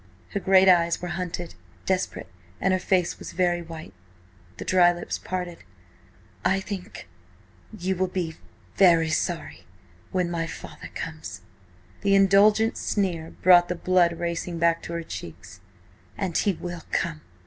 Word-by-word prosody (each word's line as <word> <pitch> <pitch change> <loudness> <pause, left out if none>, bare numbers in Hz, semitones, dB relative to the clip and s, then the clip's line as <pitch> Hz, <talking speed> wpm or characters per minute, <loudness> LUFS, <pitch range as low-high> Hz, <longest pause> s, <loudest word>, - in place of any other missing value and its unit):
Her 200 - -2
great 190 0 +5
eyes 170 -2 +4
were 180 - -5
hunted, 175 -1 -4 0.3
desperate, 185 0 -1 0.3
and 190 - +2
her 185 - +2
face 180 -1 0
was - - -8
very 175 -1 +1
white. 160 - -9 0.6
The - - -6
dry 180 -1 +5
lips 175 0 -5
parted. 180 -2 -4 0.8
"I 190 - +2
think–you 190 0 -7
will 185 +1 0
be–very 170 -1 +1
sorry–when 90 - -4
my 165 -1 -2
father–comes." 155 - -8 0.6
The 200 0 +3
indulgent 205 +3 +5
sneer 175 -6 -1
brought 175 -1 +7
the 180 - -1
blood 175 -1 +2
racing 170 0 -3
back 170 0 +2
to 170 - -7
her 170 0 -3
cheeks. 90 - -9 0.6
"And 190 -5 -3
he 200 - +2
will 175 0 -6
come!" 165 -2 -1
175 Hz, 130 wpm, -25 LUFS, 165-185 Hz, 0.8 s, brought